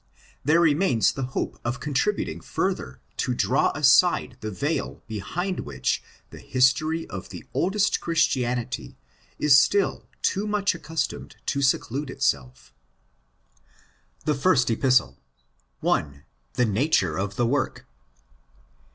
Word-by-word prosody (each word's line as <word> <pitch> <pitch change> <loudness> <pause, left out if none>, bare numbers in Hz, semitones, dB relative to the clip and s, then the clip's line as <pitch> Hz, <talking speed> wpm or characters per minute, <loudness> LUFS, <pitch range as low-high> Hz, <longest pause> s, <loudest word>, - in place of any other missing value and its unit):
There 160 +5 +4
remains 145 - +3
the 135 - -6 0.2
hope - - -2
of 120 +1 -2
contributing 135 - -1
further 65 -4 -3 0.2
to 125 - -1
draw 130 +2 +2
aside 150 0 +4
the 110 - -3
veil 145 - -3
behind 160 - -3
which 65 -3 -2 0.3
the - - -10
history 130 +6 +2
of 95 0 -7
the 90 -3 -9
oldest 195 +4 +1
Christianity 125 -7 -1 0.4
is 140 -2 +6
still 195 +7 +1 0.2
too 200 +2 0
much 205 -2 +1
accustomed 165 -1 -4
to 140 - -1
seclude 135 +1 0
itself. 65 - -2 1.5
THE 150 - +2
FIRST 135 -5 +2
EPISTLE. 115 - +2 0.6
1.—TaHe 70 - -2
Nature 100 - +2
oF 100 +1 -3
THE 120 - +1
Work. 130 +3 -1
130 Hz, 115 wpm, -25 LUFS, 105-160 Hz, 1.5 s, is